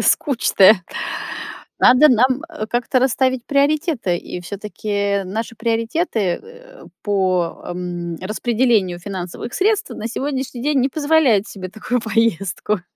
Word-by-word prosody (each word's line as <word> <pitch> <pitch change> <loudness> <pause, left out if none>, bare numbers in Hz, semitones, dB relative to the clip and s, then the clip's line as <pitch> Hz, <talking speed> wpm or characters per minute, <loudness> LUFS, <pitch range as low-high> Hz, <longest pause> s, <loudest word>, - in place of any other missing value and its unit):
скучная. 215 - +4 1.0
Надо 255 +5 +7
нам 255 +1 +3 0.3
как-то 245 +2 +1
расставить 260 -1 +1
приоритеты. 285 - +1
И 180 - -7
всё-таки 200 +1 -2
наши 225 +4 -5
приоритеты, 230 - -1 0.2
э, - - -15 0.2
по, 185 -4 0
м, 175 -1 -4
распределению 215 -2 +1
финансовых 185 +3 -6
средств 420 +2 +1
на 220 - -5
сегодняшний 265 -1 -3
день 290 -1 +2
не 260 - +2
позволяют 285 -8 +2
себе 185 -2 -7
такую 235 +5 -2
поездку 210 -3 0
230 Hz, 110 wpm, -20 LUFS, 195-265 Hz, 1.0 s, Надо